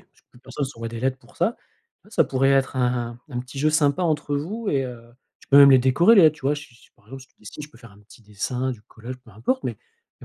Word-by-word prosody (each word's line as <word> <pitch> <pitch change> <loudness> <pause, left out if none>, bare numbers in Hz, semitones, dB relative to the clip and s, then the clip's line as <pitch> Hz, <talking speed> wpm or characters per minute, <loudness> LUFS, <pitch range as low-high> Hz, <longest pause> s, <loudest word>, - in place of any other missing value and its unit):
Parce - - -30
que - - -58
plus 120 - -20
personne 140 - -5
s'envoie 115 -4 -7
des 115 0 -7
lettres 130 +1 -1
pour - - -22
ça. - - 0 0.5
Ouais, - - -21
ça - - +3
pourrait 135 +1 +1
être 135 0 +1
un 120 -2 -1
un 125 -4 -5
petit 130 +2 -10
jeu 155 +3 +2
sympa 150 +1 +2
entre 150 -3 -1
vous 205 +10 -4
et 135 -5 0
heu, 125 -2 -8 0.4
tu - - -21
peux 140 - +6
même 140 -1 +9
les 130 - +7
décorer 135 - +4
les 195 - +8
lettres, 155 -1 +5
tu - - -19
vois? 145 - +2
Si 145 -4 -11
si 120 - -23
par - - -29
exemple 135 +3 -10
si 130 - -20
tu - - -38
dessines, 105 +8 -10
tu 150 - -15
peux 130 - -19
faire 115 -3 -15
un 100 - -19
petit 105 +2 -19
dessin, 125 +5 -3
du 110 -4 -12
collage, 120 +4 -10
peu 125 -3 -19
importe, 120 - -2
mais - - -2 0.5
il - - -12
130 Hz, 295 wpm, -23 LUFS, 120-145 Hz, 0.5 s, même